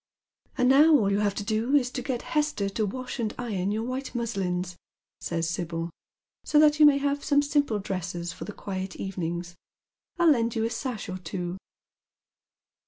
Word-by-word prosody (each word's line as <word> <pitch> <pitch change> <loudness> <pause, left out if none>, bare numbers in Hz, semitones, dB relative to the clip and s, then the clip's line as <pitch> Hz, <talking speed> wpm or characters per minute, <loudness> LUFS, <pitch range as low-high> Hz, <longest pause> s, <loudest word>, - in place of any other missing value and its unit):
" - - -40
And 250 -2 +3
now 295 +4 +7
all 200 -6 +1
you 200 - +2
have 205 -1 +1
to 205 - -3
do 225 +6 +1
is 250 -3 +3
to 255 - -3
get 250 -2 -3
Hester 300 -10 0
to 210 +2 -1
wash 255 +5 -5
and 220 -2 -2
iron 205 -6 -2
your 220 +2 -1
white 255 +2 -4
muslins," 185 -6 -2 0.4
says 165 -1 -2
Sibyl, 170 0 -3 0.3
" - - -67
so 300 - +1
that 300 0 +6
you 300 - +9
may 285 -1 +5
have 285 0 -1
some 285 -1 +3
simple 285 -6 +1
dresses 180 -3 -4
for - - -8
the - - -6
quiet 190 -2 -5
evenings. 175 -2 -4 0.6
I'll 340 -2 +5
lend 235 -4 +1
you 220 - 0
a 230 - -2
sash 240 -2 -4
or 185 0 -5
two." 180 +1 -5
220 Hz, 190 wpm, -27 LUFS, 185-265 Hz, 0.6 s, you